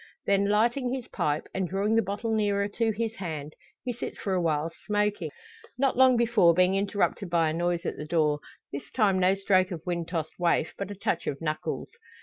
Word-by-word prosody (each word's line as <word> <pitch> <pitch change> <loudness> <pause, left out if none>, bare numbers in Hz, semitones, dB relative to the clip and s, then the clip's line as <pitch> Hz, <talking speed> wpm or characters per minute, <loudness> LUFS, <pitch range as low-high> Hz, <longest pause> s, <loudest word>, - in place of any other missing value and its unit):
Then 200 0 +3
lighting 240 +4 +2
his 260 -2 -4
pipe, 150 +1 -1
and 190 -2 -1
drawing 200 +3 0
the 225 - +5
bottle 210 +3 -2
nearer 205 -2 +1
to 225 +2 0
his 225 +1 -3
hand, 155 -5 -5 0.3
he 250 - -2
sits 240 - -6
for 195 - -2
a 185 - +1
while 160 -1 0 0.2
smoking. 210 0 0 0.5
Not 270 0 +2
long 255 -1 +6
before 225 -8 +4
being 185 +1 +4
interrupted 200 -1 0
by 165 -2 +2
a - - -3
noise 175 +1 -1
at - - -3
the 150 - -5
door; 150 -2 +2 0.3
this 140 - -6
time 200 -6 +2
no 185 +1 +4
stroke 190 -1 +2
of 170 -5 -6
wind 170 -2 -2
tossed 165 -2 -4
waif, 170 -2 +1
but 200 -1 -5
a 205 - -6
touch 180 -3 -2
of 140 - -2
knuckles. 155 -1 -3
195 Hz, 205 wpm, -28 LUFS, 170-215 Hz, 0.5 s, long